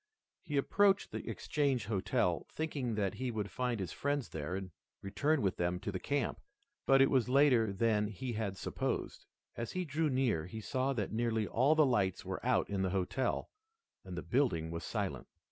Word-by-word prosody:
He 150 Hz, -4 st, -3 dB
approached 195 Hz, +7 st, +3 dB
the -, -, -5 dB
Exchange 140 Hz, -7 st, 0 dB
Hotel, 100 Hz, -3 st, 0 dB
thinking 140 Hz, -7 st, -2 dB
that 100 Hz, -3 st, 0 dB
he 130 Hz, 0 st, -3 dB
would 105 Hz, -3 st, -3 dB
find 125 Hz, -3 st, -1 dB
his 90 Hz, -3 st, -3 dB
friends 145 Hz, -2 st, -1 dB
there 80 Hz, +3 st, -4 dB
and 95 Hz, -1 st, -5 dB, 0.3 s
return 145 Hz, +9 st, +1 dB
with 95 Hz, -, 0 dB
them 90 Hz, +1 st, 0 dB
to 100 Hz, -, -4 dB
the 95 Hz, -, -3 dB
camp. 140 Hz, +2 st, -1 dB, 0.5 s
But 135 Hz, 0 st, +7 dB
it 135 Hz, -, +2 dB
was 125 Hz, -3 st, +3 dB
later 130 Hz, -6 st, +5 dB
than 105 Hz, +1 st, +2 dB
he 120 Hz, +4 st, -5 dB
had 105 Hz, -3 st, -2 dB
supposed. -, -, -3 dB, 0.3 s
As 115 Hz, -, -4 dB
he 185 Hz, -1 st, -1 dB
drew 155 Hz, +1 st, 0 dB
near 125 Hz, -, +1 dB
he 110 Hz, +4 st, -6 dB
saw 130 Hz, +4 st, -1 dB
that 105 Hz, -6 st, -2 dB
nearly 115 Hz, -1 st, 0 dB
all 135 Hz, +9 st, +3 dB
the 155 Hz, -1 st, +6 dB
lights 100 Hz, -8 st, +1 dB
were -, -, -4 dB
out -, -, +2 dB
in 100 Hz, -1 st, -2 dB
the 95 Hz, -, +1 dB
hotel, 100 Hz, +7 st, -1 dB, 0.5 s
and 90 Hz, -2 st, -7 dB
the 85 Hz, -, -4 dB
building 85 Hz, -, +1 dB
was 85 Hz, 0 st, -4 dB
silent. -, -, -3 dB
115 Hz, 190 wpm, -34 LUFS, 95-135 Hz, 0.5 s, But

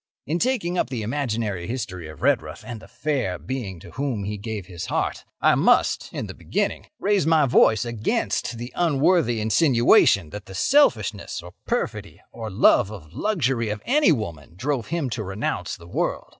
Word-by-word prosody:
"In 160 Hz, +6 st, -1 dB
taking 200 Hz, -8 st, 0 dB
up -, -, 0 dB
the 120 Hz, -5 st, -3 dB
imaginary 110 Hz, -7 st, -2 dB
history 100 Hz, -9 st, -4 dB
of 80 Hz, -1 st, -11 dB
Redruth -, -, +1 dB
and 120 Hz, -2 st, -6 dB
the -, -, -13 dB
fair 120 Hz, -4 st, -2 dB
being 115 Hz, -9 st, -5 dB
to -, -, -12 dB
whom 130 Hz, -7 st, -2 dB
he 105 Hz, +2 st, -3 dB
gave 105 Hz, -1 st, -5 dB
his 85 Hz, -2 st, -7 dB
heart, -, -, -2 dB
I -, -, +4 dB
must, -, -, +3 dB
in -, -, -4 dB
the -, -, -7 dB
beginning, -, -, -2 dB
raise 200 Hz, -5 st, +1 dB
my 160 Hz, -3 st, +5 dB
voice 110 Hz, -3 st, +4 dB
against 115 Hz, 0 st, -1 dB
the 120 Hz, +2 st, -7 dB
unworthy 150 Hz, -6 st, +2 dB
insinuation 110 Hz, -, +4 dB
that 105 Hz, +2 st, -8 dB
the 95 Hz, -, -9 dB
selfishness 110 Hz, -, +2 dB
or 90 Hz, -, -10 dB, 0.2 s
perfidy -, -, -3 dB
or 115 Hz, -2 st, -6 dB
love 95 Hz, 0 st, +4 dB
of 85 Hz, -7 st, -11 dB
luxury 135 Hz, -, 0 dB
of 105 Hz, 0 st, -4 dB
any 290 Hz, -, +4 dB
woman 85 Hz, -, -3 dB
drove 130 Hz, +2 st, -2 dB
him 170 Hz, -4 st, -1 dB
to 115 Hz, -, -3 dB
renounce 95 Hz, +2 st, -3 dB
the 85 Hz, -, -14 dB
world. -, -, -2 dB
115 Hz, 175 wpm, -24 LUFS, 100-145 Hz, 0.2 s, my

